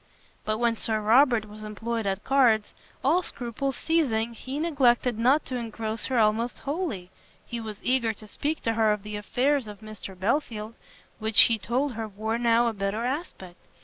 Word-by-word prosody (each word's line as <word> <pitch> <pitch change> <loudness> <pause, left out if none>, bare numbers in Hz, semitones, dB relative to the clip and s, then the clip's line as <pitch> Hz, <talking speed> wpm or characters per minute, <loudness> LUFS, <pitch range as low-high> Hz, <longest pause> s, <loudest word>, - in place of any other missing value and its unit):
But 215 0 0
when 235 -1 +1
Sir 220 0 0
Robert 230 +1 +4
was 215 +1 -11
employed 220 +1 -3
at 195 +1 -2
cards, 240 -6 +3 0.3
all 325 +7 +3
scruples 260 -1 -3
ceasing, 235 -9 +1
he 260 +4 -6
neglected 255 -7 +2
not 265 +6 +3
to 255 - -3
engross 225 -1 -3
her 260 - -1
almost 225 +2 +2
wholly. 275 - -3 0.3
He 235 - -5
was 215 -2 -7
eager 250 -3 +2
to 215 0 -11
speak 295 +8 -3
to 225 - +1
her 220 -1 +3
of 210 -1 -5
the 210 0 -6
affairs 255 +5 0
of 210 0 -10
Mr 215 -3 -9
Belfield, 220 0 -1 0.5
which 220 0 +6
he 225 -1 +5
told 255 +6 -1
her 225 -1 -4
wore 220 +3 -3
now 235 0 +3
a 230 - 0
better 200 +3 -2
aspect. 250 - -5
230 Hz, 180 wpm, -26 LUFS, 215-255 Hz, 0.5 s, which